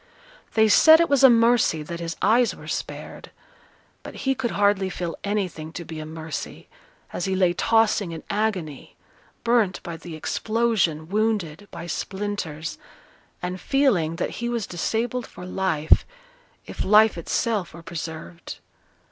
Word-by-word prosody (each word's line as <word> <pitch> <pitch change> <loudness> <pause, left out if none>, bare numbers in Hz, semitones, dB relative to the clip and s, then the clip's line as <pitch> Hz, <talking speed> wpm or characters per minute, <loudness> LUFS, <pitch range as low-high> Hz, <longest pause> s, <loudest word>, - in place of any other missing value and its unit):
They 220 -1 +5
said 315 +9 +8
it 335 - +2
was 280 -1 +4
a 265 - +10
mercy 230 -9 +3
that 170 +3 -6
his 165 -1 -4
eyes 230 +4 +3
were - - -12
spared; - - -6 0.7
but - - -10
he 270 - +3
could 245 -2 -2
hardly 200 -2 +2
feel 175 -2 -4
anything 185 -6 -3
to 170 - -6
be 160 -1 -7
a 155 - -6
mercy, 160 -1 -7 0.5
as 175 - -2
he 190 -1 0
lay 180 -2 +3
tossing 215 -2 +2
in 160 -1 -7
agony, 200 -8 -3 0.5
burnt 230 -5 +2
by 170 -2 -6
the 165 -1 -9
explosion, 215 -4 0
wounded 205 -3 -1
by - - -8
splinters, 180 -3 -4 0.6
and 180 +1 -4
feeling 215 - +2
that - - -2
he 240 - -1
was 235 -4 -2
disabled 225 +7 -2
for 180 - -10
life, 180 -5 +2 0.6
if - - -5
life 215 +2 +5
itself 190 +3 -1
were 170 - -11
preserved. 160 - -7
190 Hz, 150 wpm, -24 LUFS, 165-225 Hz, 0.7 s, a